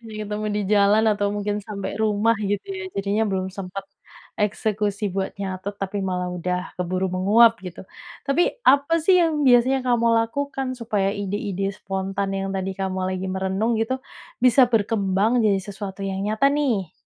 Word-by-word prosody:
Jadi 225 Hz, -2 st, -11 dB
ketemu 210 Hz, +1 st, -4 dB
di 210 Hz, -, 0 dB
jalan 210 Hz, +2 st, +4 dB
atau 205 Hz, 0 st, 0 dB
mungkin 205 Hz, 0 st, -2 dB
sampai 200 Hz, 0 st, -6 dB
rumah 220 Hz, +1 st, +2 dB
gitu 205 Hz, -, -2 dB
ya, 385 Hz, 0 st, -5 dB
jadinya 200 Hz, +2 st, 0 dB
belum 190 Hz, -1 st, -2 dB
sempet 195 Hz, 0 st, -6 dB, 0.6 s
eksekusi 210 Hz, -1 st, -1 dB
buat 195 Hz, 0 st, -3 dB
nyatet, 195 Hz, +1 st, -5 dB
tapi 200 Hz, +1 st, -3 dB
malah 180 Hz, -2 st, -2 dB
udah 180 Hz, +1 st, -3 dB
keburu 185 Hz, +1 st, -1 dB
menguap 220 Hz, +4 st, +4 dB
gitu. 185 Hz, 0 st, -9 dB, 0.4 s
Tapi, 315 Hz, -, +1 dB
apa 285 Hz, +5 st, +4 dB
sih 365 Hz, -1 st, +5 dB
yang 315 Hz, -3 st, +1 dB
biasanya 255 Hz, +1 st, +4 dB
kamu 240 Hz, -2 st, +2 dB, 0.2 s
lakukan 270 Hz, +2 st, -3 dB
supaya 210 Hz, -5 st, -1 dB
ide-ide 200 Hz, -1 st, -3 dB
spontan 195 Hz, 0 st, -3 dB
yang 195 Hz, 0 st, -2 dB
tadi 190 Hz, 0 st, -2 dB
kamu 190 Hz, -1 st, -3 dB
lagi 185 Hz, 0 st, -3 dB
merenung 190 Hz, +5 st, -1 dB
gitu, 240 Hz, +4 st, -1 dB, 0.4 s
bisa 255 Hz, +1 st, +6 dB
berkembang 210 Hz, +1 st, +2 dB
jadi 200 Hz, -2 st, +3 dB
sesuatu 200 Hz, 0 st, -7 dB
yang 195 Hz, 0 st, -3 dB
nyata 220 Hz, +6 st, +2 dB
nih? 250 Hz, -, 0 dB
205 Hz, 160 wpm, -23 LUFS, 190-230 Hz, 0.6 s, bisa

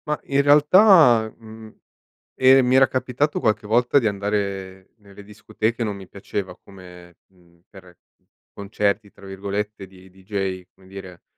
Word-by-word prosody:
Ma 150 Hz, 0 st, -2 dB
in 140 Hz, 0 st, 0 dB
realtà, 145 Hz, -, +5 dB
mhmm, 110 Hz, -1 st, -14 dB, 0.6 s
ehm, 130 Hz, 0 st, +4 dB
mi 125 Hz, +1 st, +1 dB
era 130 Hz, 0 st, +5 dB
capitato 130 Hz, +3 st, -2 dB
qualche 110 Hz, -2 st, -1 dB
volta 120 Hz, +5 st, +2 dB
di 115 Hz, -, -1 dB
andare 100 Hz, -2 st, -4 dB
nelle 100 Hz, -1 st, -16 dB
discoteche, 110 Hz, +2 st, -4 dB
non 105 Hz, -3 st, -4 dB
mi 95 Hz, -1 st, -13 dB
piaceva 100 Hz, -1 st, -7 dB
come 90 Hz, -3 st, -16 dB
mhmm, 85 Hz, -2 st, -28 dB
per 90 Hz, -4 st, -17 dB, 0.6 s
"concerti" 100 Hz, +1 st, -3 dB
tra 100 Hz, -, -17 dB
virgolette 100 Hz, +1 st, -6 dB
di 95 Hz, 0 st, -19 dB
dj 95 Hz, 0 st, -5 dB
come 95 Hz, 0 st, -22 dB
dire, 95 Hz, -2 st, -12 dB
100 Hz, 140 wpm, -21 LUFS, 95-120 Hz, 0.6 s, realtà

